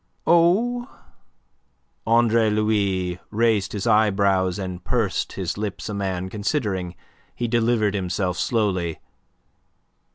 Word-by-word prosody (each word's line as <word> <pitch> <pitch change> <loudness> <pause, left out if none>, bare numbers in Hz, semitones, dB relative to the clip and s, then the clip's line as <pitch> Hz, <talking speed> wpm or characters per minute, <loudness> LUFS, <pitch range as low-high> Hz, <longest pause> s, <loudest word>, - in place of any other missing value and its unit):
"Oh," 225 +9 +3 1.2
Andre 115 -1 +4
Louis 100 -4 0
raised 110 -2 +1
his 100 -2 -3
eyebrows 100 -3 +2
and 90 -2 -5
pursed 110 -2 -1
his 95 0 -4
lips, 105 0 -4
a - - -3
man 95 -2 -2
considering. 100 - -2 0.4
He 120 - -2
delivered 115 -3 +1
himself 90 -2 -2
slowly. 95 -8 0
105 Hz, 100 wpm, -23 LUFS, 95-115 Hz, 1.2 s, Andre